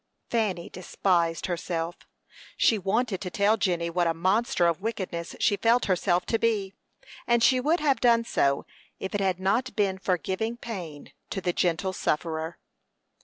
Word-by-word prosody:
Fanny 210 Hz, -7 st, 0 dB
despised 175 Hz, -2 st, 0 dB
herself. 170 Hz, -1 st, -3 dB, 0.6 s
She 220 Hz, -, +3 dB
wanted 205 Hz, +1 st, 0 dB
to 185 Hz, -, -4 dB
tell 200 Hz, +4 st, +3 dB
Jenny 175 Hz, -5 st, 0 dB
what 170 Hz, 0 st, +1 dB
a 165 Hz, -, 0 dB
monster 190 Hz, +4 st, +2 dB
of 170 Hz, +1 st, +1 dB
wickedness 190 Hz, -6 st, -4 dB
she 205 Hz, -, +2 dB
felt 230 Hz, +3 st, +3 dB
herself 180 Hz, -1 st, +1 dB
to 225 Hz, -, 0 dB
be, 205 Hz, -4 st, 0 dB, 0.5 s
and 235 Hz, -1 st, +3 dB
she 255 Hz, +1 st, +5 dB
would 310 Hz, +7 st, +2 dB
have 285 Hz, -3 st, +2 dB
done 235 Hz, -2 st, +4 dB
so 140 Hz, -9 st, +1 dB, 0.3 s
if 190 Hz, -, -5 dB
it 205 Hz, -, 0 dB
had 190 Hz, -2 st, 0 dB
not 230 Hz, +7 st, 0 dB
been 195 Hz, -3 st, +1 dB
for 185 Hz, -1 st, +1 dB
giving 220 Hz, +8 st, -3 dB
pain 180 Hz, -12 st, -7 dB, 0.2 s
to -, -, -3 dB
the 175 Hz, -2 st, -1 dB
gentle 180 Hz, +2 st, 0 dB
sufferer. 160 Hz, -1 st, -2 dB
190 Hz, 165 wpm, -27 LUFS, 175-225 Hz, 0.6 s, she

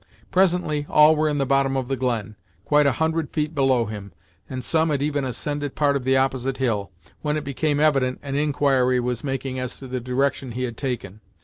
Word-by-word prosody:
Presently 180 Hz, -5 st, +2 dB
all 150 Hz, +1 st, +6 dB
were 155 Hz, 0 st, +1 dB
in 145 Hz, -, -1 dB
the 140 Hz, -, +1 dB
bottom 135 Hz, 0 st, +2 dB
of 130 Hz, -2 st, -2 dB
the 135 Hz, -, -1 dB
glen, 115 Hz, -5 st, -2 dB, 0.3 s
quite 150 Hz, -1 st, +4 dB
a 140 Hz, -, +3 dB
hundred 160 Hz, +1 st, -1 dB
feet 150 Hz, +1 st, -2 dB
below 135 Hz, -5 st, +2 dB
him, 100 Hz, -2 st, -7 dB, 0.4 s
and 130 Hz, -1 st, -5 dB
some 160 Hz, +2 st, +1 dB
had 140 Hz, -2 st, 0 dB
even 145 Hz, -1 st, 0 dB
ascended 145 Hz, +2 st, -3 dB
part 145 Hz, -2 st, +2 dB
of 135 Hz, -2 st, -2 dB
the 130 Hz, 0 st, +3 dB
opposite 130 Hz, 0 st, 0 dB
hill, 110 Hz, -7 st, -1 dB, 0.3 s
when 150 Hz, 0 st, 0 dB
it 150 Hz, -, -3 dB
became 145 Hz, +1 st, -1 dB
evident 135 Hz, -4 st, +2 dB
an 140 Hz, -2 st, -5 dB
inquiry 140 Hz, -3 st, +2 dB
was 120 Hz, -2 st, -2 dB
making 135 Hz, -1 st, -3 dB
as 125 Hz, 0 st, -4 dB
to 135 Hz, -, -9 dB
the 130 Hz, 0 st, -3 dB
direction 130 Hz, 0 st, -1 dB
he 125 Hz, +2 st, -3 dB
had 120 Hz, -2 st, -3 dB
taken. 110 Hz, -6 st, -4 dB
135 Hz, 210 wpm, -23 LUFS, 125-150 Hz, 0.4 s, all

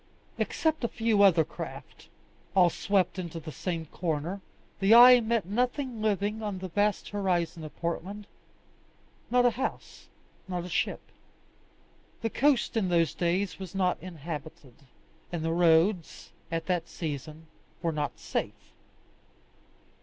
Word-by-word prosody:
Except 315 Hz, -4 st, 0 dB
a -, -, +2 dB
few 225 Hz, -3 st, +1 dB
other 175 Hz, -5 st, +6 dB
craft, -, -, -9 dB, 0.5 s
all 180 Hz, -3 st, +5 dB
swept 190 Hz, 0 st, 0 dB
into 170 Hz, -2 st, -5 dB
the 155 Hz, -1 st, -8 dB
same 165 Hz, 0 st, -4 dB
corner, 165 Hz, +4 st, -3 dB, 0.4 s
the 200 Hz, +3 st, +6 dB
eye 245 Hz, +1 st, +10 dB
met 225 Hz, -3 st, 0 dB
nothing 245 Hz, -, -1 dB
living 210 Hz, 0 st, 0 dB
on 205 Hz, -3 st, -3 dB
the 185 Hz, 0 st, -6 dB
vast 205 Hz, +3 st, 0 dB
horizon 180 Hz, -5 st, -1 dB
of 155 Hz, -, -9 dB
Portland 185 Hz, +5 st, -4 dB, 1.0 s
not 245 Hz, 0 st, +4 dB
a 245 Hz, -, +5 dB
house, 265 Hz, +3 st, -5 dB, 0.4 s
not 180 Hz, -2 st, -3 dB
a -, -, -7 dB
ship. -, -, -1 dB, 1.2 s
The 225 Hz, -, -1 dB
coast 275 Hz, -3 st, +2 dB
in 205 Hz, -5 st, +1 dB
those 170 Hz, -2 st, +2 dB
days 185 Hz, +3 st, -1 dB
was 190 Hz, -1 st, -8 dB
not 185 Hz, -2 st, +1 dB
inhabited, 155 Hz, -5 st, -8 dB, 0.6 s
and 165 Hz, -2 st, -3 dB
the 165 Hz, -, 0 dB
roads, 170 Hz, +1 st, +2 dB, 0.2 s
at 165 Hz, -1 st, -2 dB
that 175 Hz, -3 st, -1 dB
season, 155 Hz, 0 st, -6 dB, 0.4 s
were 165 Hz, -, +1 dB
not 150 Hz, -2 st, -3 dB
safe. -, -, -5 dB
185 Hz, 135 wpm, -28 LUFS, 165-210 Hz, 1.2 s, eye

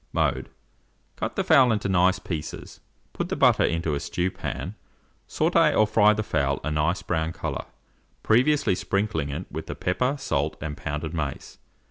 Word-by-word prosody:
Mode. -, -, 0 dB, 0.7 s
Cut -, -, -4 dB
the -, -, 0 dB
fowl 130 Hz, -3 st, +5 dB
into 105 Hz, -2 st, 0 dB
nice 95 Hz, 0 st, +3 dB
pieces; 80 Hz, -5 st, -6 dB, 0.3 s
put -, -, -3 dB
the -, -, -1 dB
butter -, -, +4 dB
into 85 Hz, -2 st, 0 dB
a 70 Hz, -, -1 dB
stew 90 Hz, +5 st, -2 dB
pan; 85 Hz, +4 st, -5 dB, 0.5 s
sautez -, -, +2 dB
or 110 Hz, -, +5 dB
fry 105 Hz, 0 st, +4 dB
the 110 Hz, 0 st, -2 dB
fowl 70 Hz, -6 st, 0 dB
a 75 Hz, -, -2 dB
nice 75 Hz, +4 st, 0 dB
brown 80 Hz, -1 st, -1 dB
colour, -, -, -4 dB, 0.6 s
previously 130 Hz, +2 st, +3 dB
sprinkling 95 Hz, -6 st, -1 dB
it 80 Hz, +6 st, -4 dB
with 80 Hz, +1 st, -6 dB
pepper, 125 Hz, +10 st, 0 dB
salt, 75 Hz, -, -1 dB
and 75 Hz, -2 st, -5 dB
pounded 75 Hz, +3 st, -4 dB
mace. 75 Hz, -4 st, -5 dB
90 Hz, 160 wpm, -25 LUFS, 75-105 Hz, 0.7 s, fowl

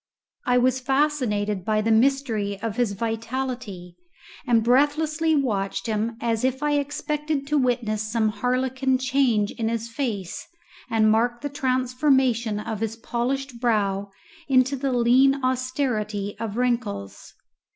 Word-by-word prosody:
I 250 Hz, 0 st, +4 dB
was 255 Hz, +1 st, +2 dB
fascinated 255 Hz, -8 st, 0 dB
by 215 Hz, +2 st, +1 dB
the 225 Hz, +1 st, +1 dB
mystery 225 Hz, -5 st, +1 dB
of 225 Hz, -2 st, -2 dB
his 240 Hz, -4 st, 0 dB
vitality, 225 Hz, -4 st, -4 dB, 0.5 s
and 230 Hz, -2 st, +3 dB
breathlessly 305 Hz, +6 st, +2 dB
watched 200 Hz, -8 st, -1 dB
him 225 Hz, +1 st, -1 dB
as 230 Hz, -1 st, -1 dB
if 260 Hz, +2 st, 0 dB
I 295 Hz, -, +1 dB
expected 295 Hz, 0 st, -2 dB
to 295 Hz, +1 st, 0 dB
witness 235 Hz, -4 st, 0 dB
some 220 Hz, -2 st, +2 dB
harlequin 260 Hz, +3 st, 0 dB
change 255 Hz, -5 st, +1 dB
in 225 Hz, -1 st, -2 dB
his 230 Hz, 0 st, -3 dB
face 225 Hz, -8 st, -4 dB, 0.4 s
and 215 Hz, -1 st, +3 dB
mark 240 Hz, +2 st, +1 dB
the 290 Hz, -, -3 dB
transformation 255 Hz, -4 st, +1 dB
of 210 Hz, 0 st, -4 dB
his 225 Hz, 0 st, -2 dB
polished 245 Hz, +2 st, -3 dB
brow 200 Hz, -4 st, 0 dB, 0.4 s
into 265 Hz, 0 st, +3 dB
the 270 Hz, 0 st, -2 dB
lean 250 Hz, +3 st, +4 dB
austerity 245 Hz, -6 st, -1 dB
of 225 Hz, -1 st, -4 dB
wrinkles. 235 Hz, -, -2 dB
245 Hz, 130 wpm, -24 LUFS, 220-265 Hz, 0.5 s, I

